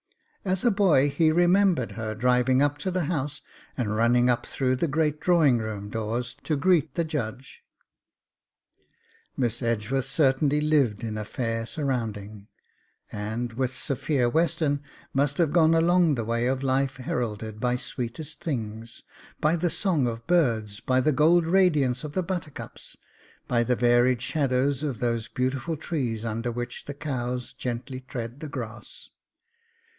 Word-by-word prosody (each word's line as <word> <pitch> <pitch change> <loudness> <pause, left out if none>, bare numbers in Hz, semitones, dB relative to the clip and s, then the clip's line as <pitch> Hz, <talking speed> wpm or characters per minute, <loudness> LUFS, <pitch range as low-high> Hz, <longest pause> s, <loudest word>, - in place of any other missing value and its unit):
As 190 +2 -1
a 240 - +5
boy 170 -9 +4
he 155 +3 +3
remembered 175 - +3
her 110 -1 -4
driving 125 +3 +3
up 145 0 0
to 185 - -2
the 180 -1 0
house 145 -2 -3 0.3
and 110 -5 -1
running 120 +2 +3
up 120 - -2
through 130 -1 0
the 170 - 0
great 150 0 0
drawing 155 -9 +4
room 105 -2 -5
doors 115 +2 -3
to 155 - +1
greet 170 -1 +2
the 170 - +1
Judge. 130 -5 -5 1.8
Miss 120 -2 -1
Edgeworth 115 +3 0
certainly 145 0 +2
lived 140 -8 +2
in 110 -1 -3
a - - -3
fair 115 0 -3
surrounding, 110 -8 -3 0.6
and, 110 +3 -4
with 130 +1 -1
Sophia 135 0 0
Western, 155 0 +1 0.3
must 140 +1 +1
have 165 -4 +2
gone 165 -1 +5
along 170 -1 +4
the 115 -3 -3
way 115 +1 0
of 130 +1 -1
life 135 0 +1
heralded 110 -4 -3
by 125 +1 +1
sweetest 125 +5 -5
things, 115 -5 -5 0.4
by 155 +2 +2
the 175 +1 0
song 160 -6 +1
of 115 -1 -5
birds, 115 -12 +1
by 130 0 +1
the 155 +4 +3
gold 160 +4 +4
radiance 155 -9 +3
of 150 -1 -6
the 185 - 0
buttercups, 170 -5 -6 0.5
by 120 -1 +2
the 125 +1 +1
varied 120 +1 +3
shadows 135 -1 +1
of 140 -6 -2
those 115 -1 -1
beautiful 130 +5 -2
trees 125 -9 -3
under 115 +2 -2
which 120 +1 -5
the 145 - -6
cows 125 -4 -3
gently 125 +2 -5
tread 125 -1 -7
the 155 -1 -6
grass. 120 -4 -8
130 Hz, 150 wpm, -26 LUFS, 120-155 Hz, 1.8 s, a